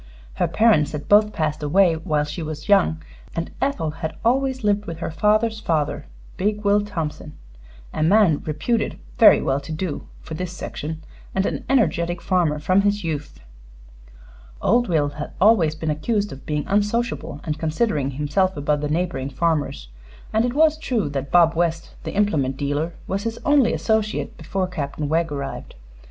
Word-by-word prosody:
Her - - 0
parents 215 -11 +3
had 145 -1 -5
both 210 +1 +5
passed 155 -3 -2
away 175 +4 +4
while 155 -2 0
she 150 +3 -5
was 155 -1 -6
young, 180 -5 +3 0.3
and 165 0 -3
Ethel 185 - 0
had 160 0 -5
always 260 +1 +1
lived 205 0 +1
with 165 -1 -5
her 165 - -4
father's 215 +6 +2
father, 160 -8 -1 0.3
big 210 +2 -1
Will 205 +1 +4
Thompson, 160 -6 -5 0.6
a - - -3
man 175 -2 +4
reputed 160 +10 -1 0.2
very - - +7
well 135 +1 +1
to 140 +3 -9
do 155 0 -4
for - - -9
this 180 +2 -4
section, 160 -2 -6 0.3
and 190 0 +1
an - - -3
energetic 175 -9 +1
farmer 170 -5 +1
from 185 +6 +2
his 205 0 0
youth. 150 -3 -5 1.2
Old 240 +1 +2
Will 150 -4 +2
had 150 +1 -7
always 185 -7 +4
been 160 0 -2
accused 205 +7 -1
of 135 - -11
being 150 -1 -1
unsociable 210 -6 -1
and 155 -2 -3
considering 155 - 0
himself 150 +7 0
above 145 0 0
the 150 - -2
neighboring 155 -4 -1
farmers; 145 - -1 0.4
and 220 +2 +3
it 245 +1 -2
was 310 0 +4
true 240 - -1
that 140 -1 -4
Bob 170 -2 +5
West, 165 -1 -1
the - - -5
implement 150 -11 +1
dealer, 145 +4 -1
was 195 +1 -2
his 230 +2 -3
only 285 -5 +4
associate 220 -1 -1
before 185 +4 -2
Captain 150 -4 -4
Wegg 165 +1 0
arrived. 140 -1 -5
165 Hz, 170 wpm, -22 LUFS, 150-210 Hz, 1.2 s, very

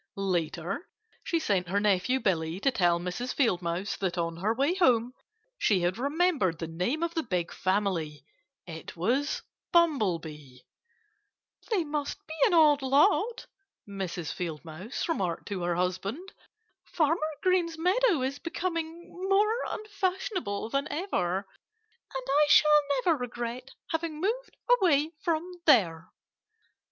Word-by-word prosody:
Later 180 - -2 0.3
she 335 - 0
sent 195 - 0
her 195 +3 +1
nephew 205 +5 +2
Billy 165 -5 0
to 275 - +3
tell 175 -7 +2
Mrs. 180 +9 -4
Field 225 -10 +2
Mouse 175 +4 -2
that 190 -2 -2
on 165 -1 -2
her 200 +5 0
way 275 +8 +1
home 250 -9 +3 0.5
she 200 - +3
had 175 +5 0
remembered 285 - +1
the 165 - -4
name 180 - -2
of 335 0 -1
the 330 - 0
big 180 - -2
family. 180 -7 -1 0.4
It 160 0 -9
was 255 - 0 0.3
Bumblebee. 165 - 0 1.1
"They 410 -7 +2
must 295 -2 -3
be 315 - -8
an 370 - +2
odd 300 -3 +6
lot," 380 - +2 0.4
Mrs. 185 -5 -4
Field 165 -3 -5
Mouse 175 - -5
remarked 185 - -2
to 195 -3 -3
her 175 0 0
husband. 195 - -3 0.5
"Farmer 325 +1 +1 0.2
Green's 355 -3 +2
meadow 365 - +2
is 270 +2 -2
becoming 335 0 -4 0.2
more 425 +4 +3
unfashionable 380 - -3
than 275 +1 0
ever. 295 - -1 0.8
And 265 - -3
I 290 +2 +4
shall 300 0 +7 0.2
never 330 -3 +4
regret 245 +1 -5 0.2
having 325 -1 -2
moved 465 +8 -2 0.2
away 310 -4 +3
from 335 0 0 0.2
there." 170 - +4
250 Hz, 135 wpm, -28 LUFS, -, 1.1 s, shall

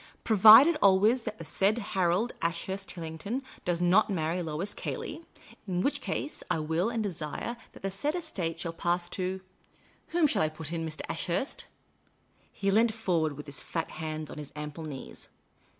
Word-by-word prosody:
" - - -35
Provided 220 - +9
always 205 +6 +5
that 215 - -4
the - - -7
said 195 +7 +2 0.2
Harold 190 +5 +2
Ashurst 190 +3 -2
Tillington 170 - -4 0.2
does 175 -1 0
not 185 +6 +4
marry 170 -1 -1
Lois 165 +5 -3
Cayley; 320 +2 -5 0.4
in 180 -1 0
which 285 0 0
case 295 +3 -3
I 180 - +2
will 160 +6 0
and 230 -2 -1
desire 175 +4 -4 0.2
that - - -14
the 195 - -1
said 290 - -2
estate 180 - -3
shall 165 - -3
pass 175 +1 0
to 185 +1 -3 0.7
whom 340 -1 +2
shall 225 -9 +2
I 155 - +2
put 155 +1 -7
in, 165 -1 -2
Mr. 155 -1 -4
Ashurst?" 180 - -2 0.9
He 195 0 -1
leant 220 +2 +3
forward 170 -8 0
with 150 - -7
his 140 -1 -4
fat 165 - -4
hands 155 -1 -5
on - - -7
his 145 -2 -8
ample 150 +1 -6
knees. 140 -4 -8
180 Hz, 175 wpm, -29 LUFS, 160-215 Hz, 0.9 s, Provided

